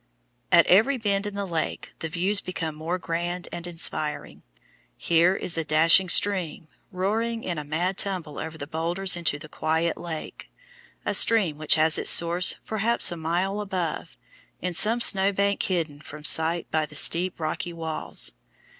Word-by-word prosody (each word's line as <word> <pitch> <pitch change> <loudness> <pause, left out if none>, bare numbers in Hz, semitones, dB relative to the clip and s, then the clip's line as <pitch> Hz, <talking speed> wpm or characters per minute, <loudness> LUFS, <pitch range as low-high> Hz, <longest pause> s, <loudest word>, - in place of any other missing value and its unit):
At 170 -2 +6
every 225 +9 +4
bend 205 -3 -1
in 205 - -7
the 200 0 -3
lake 165 -4 -4
the 160 - -4
views 190 +5 0
become 165 -3 -5
more 160 +4 -3
grand 175 +1 -4
and 175 0 -6
inspiring. 160 -3 -3 0.6
Here 170 +3 +3
is 165 -3 -3
a - - -1
dashing 165 +4 +4
stream, 175 -5 +1 0.2
roaring 225 +5 -2
in 175 -4 -3
a - - -5
mad 175 +6 -2
tumble 180 -7 -2
over 160 0 -6
the 145 - -6
boulders 170 +5 +1
into 170 -4 -2
the 155 +1 -11
quiet 160 +2 -1
lake 165 -3 -7 0.6
a - - 0
stream 190 -10 +3
which 155 - +4
has 160 0 +2
its - - 0
source 170 +2 +4
perhaps 220 0 +1
a - - -4
mile 175 +5 -2
above, 180 - -4 0.4
in 180 0 -3
some 225 +7 +4
snow 195 -3 +2
bank 200 +1 0
hidden 165 -6 -2
from 150 0 -11
sight 165 +2 +2
by 155 -1 0
the 150 - -14
steep, 175 +5 +2
rocky 160 +2 -3
walls. 160 - -2
170 Hz, 165 wpm, -25 LUFS, 160-195 Hz, 0.6 s, At